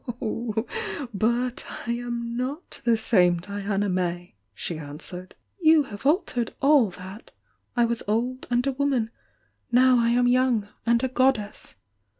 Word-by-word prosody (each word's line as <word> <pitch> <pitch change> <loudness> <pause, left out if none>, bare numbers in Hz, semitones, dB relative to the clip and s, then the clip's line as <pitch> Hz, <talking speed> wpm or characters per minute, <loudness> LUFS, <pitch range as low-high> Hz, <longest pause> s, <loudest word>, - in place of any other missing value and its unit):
"Oh, 225 0 -2 0.5
but 235 +4 0 0.2
I 235 - -1
am 235 -1 -3
not 265 +8 -5
the 235 - +4
saici 180 -6 +3
Diana 200 +2 -2
May!" 175 -3 -2 0.2
she 160 - -2
answered. 160 +5 -8 0.2
"You 315 -3 +5
have 220 0 -5
altered 285 - 0
all 275 -6 +5
that. 190 +4 -11 0.5
I 240 - +5
was 235 0 -2
old, 245 +5 -1
and 245 +1 +1
a 275 - +1
woman, 260 -4 0 0.3
— - - -43
now 250 0 +5
I 235 0 +2
am 245 +1 +3
young, 245 -4 +2 0.2
and 235 +1 +3
a - - +3
goddess!" 255 - 0
235 Hz, 150 wpm, -25 LUFS, 205-255 Hz, 0.5 s, You